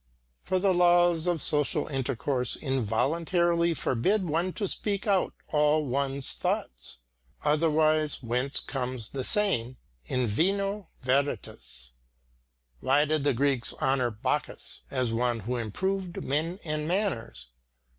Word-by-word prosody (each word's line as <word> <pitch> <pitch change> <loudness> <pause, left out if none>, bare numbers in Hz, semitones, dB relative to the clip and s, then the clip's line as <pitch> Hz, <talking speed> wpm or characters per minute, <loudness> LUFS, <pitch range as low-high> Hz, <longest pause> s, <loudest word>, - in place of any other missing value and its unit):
For 185 - -1
the 190 0 +3
laws 175 -1 +4
of 170 -5 +1
social 150 -2 +3
intercourse 130 -1 -1
involuntarily 165 - +1
forbid 185 - 0
one 170 +4 0
to 205 - -2
speak 200 +1 -2
out 195 -3 +1
all 150 0 +2
one's 135 +1 0
thoughts. 60 0 -3 0.5
Otherwise 155 0 +2
whence 125 +4 0
comes 125 -4 -4
the 135 -2 -4
saying, 130 - +1 0.3
In 125 - 0
vino 195 - 0
veritas? 125 - -2 0.9
Why 140 - +3
did 155 -1 0
the 145 -1 +2
Greeks 135 -2 +1
honour 130 -2 +1
Bacchus 110 -1 -4
as 125 -4 -1
one 120 0 0
who 120 +5 -3
improved 185 - -3
men 160 +6 -1
and 155 -1 -2
manners? 170 - -2
150 Hz, 120 wpm, -28 LUFS, 125-175 Hz, 0.9 s, laws